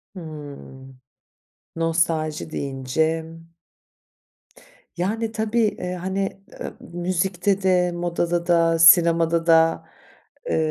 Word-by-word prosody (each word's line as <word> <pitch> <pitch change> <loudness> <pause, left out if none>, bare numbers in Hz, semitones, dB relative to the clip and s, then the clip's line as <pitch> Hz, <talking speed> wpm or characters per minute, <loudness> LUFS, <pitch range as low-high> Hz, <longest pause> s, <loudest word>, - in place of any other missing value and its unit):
Hıı. 145 -5 -10 0.8
Nostalji 165 -2 -1
deyince 140 +4 -2 1.7
Yani, 220 +5 -2
tabii, 220 +1 -1
eee, 180 -2 -4
hani, 195 +2 -4 0.2
ııı, - - -5
müzikte 180 +2 -1
de, 180 -1 +2
modada 175 0 -2
da, 165 -1 +3
sinemada 165 -1 +5
da, 165 0 +4 0.7
ııı, - - +1
170 Hz, 85 wpm, -22 LUFS, 160-180 Hz, 1.7 s, sinemada